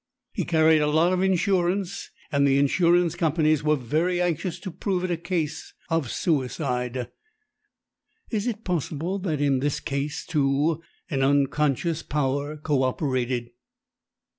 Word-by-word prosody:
He 185 - -2
carried 160 -1 +4
a 150 - +2
lot 160 +4 +3
of 185 - +1
insurance, 190 0 0 0.2
and 140 -1 +3
the 135 0 +3
insurance 170 +4 +3
companies 155 -3 +2
were 150 0 +3
very 155 +8 0
anxious 175 0 -1
to 190 - -5
prove 180 +1 -2
it 185 - -1
a - - +2
case 165 -2 -3 0.2
of 165 -6 0
suicide. 125 -5 -1 1.2
Is 215 0 -1
it 225 -2 -3
possible 175 +2 -2
that 165 -6 -2
in 140 -2 +2
this 145 +1 -1
case, 140 +1 -3
too, 150 +2 +1 0.3
an 135 -2 0
'unconscious 145 +3 +1
power' 145 +1 -1
co 150 -2 0
operated?" 130 -3 -1
155 Hz, 140 wpm, -25 LUFS, 140-175 Hz, 1.2 s, carried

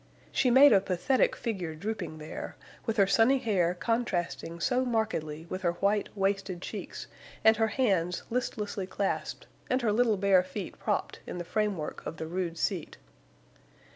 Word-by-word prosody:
She 255 - +2
made 265 +2 +8
a 195 - +6
pathetic 195 +8 +1
figure 185 -9 -3
drooping 180 -3 -4
there, 155 0 -7 0.3
with 225 - 0
her 200 - +6
sunny 225 +7 +4
hair 185 -8 +1
contrasting 175 -6 -2
so 250 +7 +1
markedly 215 -10 -1
with 185 +2 -5
her 170 -2 +1
white, 200 +3 +1
wasted 195 -2 0
cheeks - - -6 0.4
and 220 0 +6
her 225 0 +3
hands 190 -8 +1
listlessly 210 -5 -2
clasped 195 +1 -2 0.2
and 255 0 +1
her 220 - +3
little 225 -1 +3
bare 195 -1 +5
feet 185 +2 -7
propped - - -2
in - - -5
the 175 - -4
framework 205 -6 -2
of 160 - -6
the 160 - -4
rude 170 0 -3
seat. - - -2
195 Hz, 160 wpm, -29 LUFS, 175-225 Hz, 0.4 s, made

